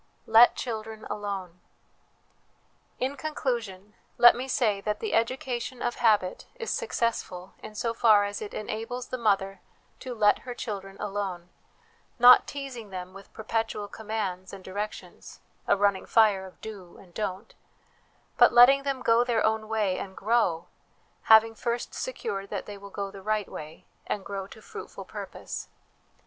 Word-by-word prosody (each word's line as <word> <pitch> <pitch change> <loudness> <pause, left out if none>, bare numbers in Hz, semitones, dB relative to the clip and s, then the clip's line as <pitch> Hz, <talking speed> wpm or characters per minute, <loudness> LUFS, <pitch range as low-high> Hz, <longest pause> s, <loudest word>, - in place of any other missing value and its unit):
Let 225 +2 +7
Children 220 -2 -5
Alone. 195 -4 -5 1.4
In 265 +2 -1
conclusion, 230 -10 -3 0.2
let 240 - +8
me 255 +2 -4
say 215 -6 +1
that 210 +1 -2
the 440 - -3
education 245 +1 -1
of 240 - -1
habit 210 -6 +2
is 465 -2 -4
successful 230 - -2
in 215 0 -10
so 230 +1 -1
far 220 -3 +5
as 205 0 -4
it 210 - -6
enables 225 +4 -5
the 255 - -4
mother 195 -3 +1 0.4
to 255 -2 -6
let 210 -2 +4
her 245 -1 -7
children 195 -4 -6
alone, 195 -4 -4 0.7
not 245 0 +8
teasing 265 -6 -7
them 185 -1 -7
with 195 0 -13
perpetual 220 -1 -3
commands 205 -4 -4
and 195 -1 -10
direc 205 +3 -3
tions - - -13 0.3
a - - +4
running 200 -1 +1
fire 205 -4 +4
of 185 - -17
Do 200 -5 -9
and 180 -3 -17
Don't; 205 +1 -4 0.8
but - - +7
letting 260 +3 +7
them 275 -2 -3
go 230 +1 +4
their 235 -3 +1
own 220 0 0
way 210 -4 0
and 190 -1 -7
grow, 195 -7 +1 0.6
having 225 0 +7
first 235 +2 -3
secured 200 - -4
that 200 - -4
they 205 - -8
will 200 0 -11
go 200 0 -5
the 195 -1 -10
right 215 0 -1
way, 155 +1 -9 0.2
and 200 - -3
grow 195 -1 -5
to 220 +2 -14
fruitful 435 - -9
purpose. - - -7
215 Hz, 155 wpm, -27 LUFS, 195-235 Hz, 1.4 s, let